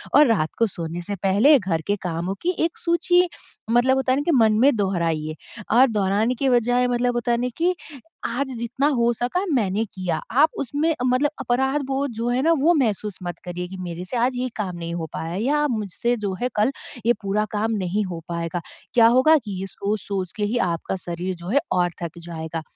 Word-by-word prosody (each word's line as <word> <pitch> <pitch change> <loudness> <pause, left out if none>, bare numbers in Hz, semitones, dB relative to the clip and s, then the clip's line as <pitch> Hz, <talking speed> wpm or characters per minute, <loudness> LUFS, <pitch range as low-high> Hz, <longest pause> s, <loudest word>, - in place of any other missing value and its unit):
और 295 +1 +7
रात 185 -9 +2
को 230 - +4
सोने 170 -2 -5
से 200 +4 -4
पहले 215 +10 +6
घर 170 -5 -1
के 205 - +2
कामों 180 +2 -2
की 360 +1 0
एक - - -21
सूची 355 +1 +3 0.4
मतलब 250 +2 +4
होता 265 -1 +1
है - - +1
ना 290 - 0
कि 340 - +2
मन 220 -2 +5
में 275 +1 +5
दोहराइए 165 -6 -1 0.4
और 260 +2 +7
दोहराने 210 +3 +1
के 270 +2 +1
बजाय 245 +1 +3
मतलब 245 0 +1
होता 240 0 0
है 235 - +3
ना 250 - 0
कि 355 +2 +2 0.5
आज 265 +4 -1
जितना 245 +5 0
हो 235 0 +3
सका 250 - -1
मैंने 215 -3 +1
किया। 185 -3 -3
आप 295 +6 +5
उसमें 290 +5 0
मतलब 255 +4 +2
अपराध 265 +3 +1
बोध 275 -1 -1
जो 230 +2 -3
है 245 +1 +1
ना 330 - +4
वो 335 +5 +4
महसूस 210 - 0
मत 175 0 -5
करिए 180 0 -4
कि 190 - -8
मेरे 175 0 -5
से 240 - -3
आज 245 +2 +1
ये 255 0 -1
काम 190 -4 -3
नहीं 170 0 -5
हो 165 - -3
पाया 165 +1 -4
है 195 - -2
या 290 +3 +2
आप 295 -1 +1
मुझसे 220 +2 -1
जो 205 -3 -2
है 250 - +1
कल 215 +6 +3 0.4
ये 240 - +6
पूरा 210 +2 0
काम 220 +2 0
नहीं 200 +4 0
हो 175 -3 -5
पाएगा। 170 0 -3 0.3
क्या 230 -2 +7
होगा 260 +7 +6
कि 225 -7 -6
ये 195 - -4
सोच-सोच 200 -1 -3
के 210 - -1
ही 235 +4 -1
आपका 170 +3 -3
शरीर 175 +2 -3
जो 175 +1 -10
है 280 +5 +4
और 175 -1 +2
थक 170 0 -5
जाएगा। 165 -1 -5
220 Hz, 220 wpm, -23 LUFS, 180-255 Hz, 0.5 s, और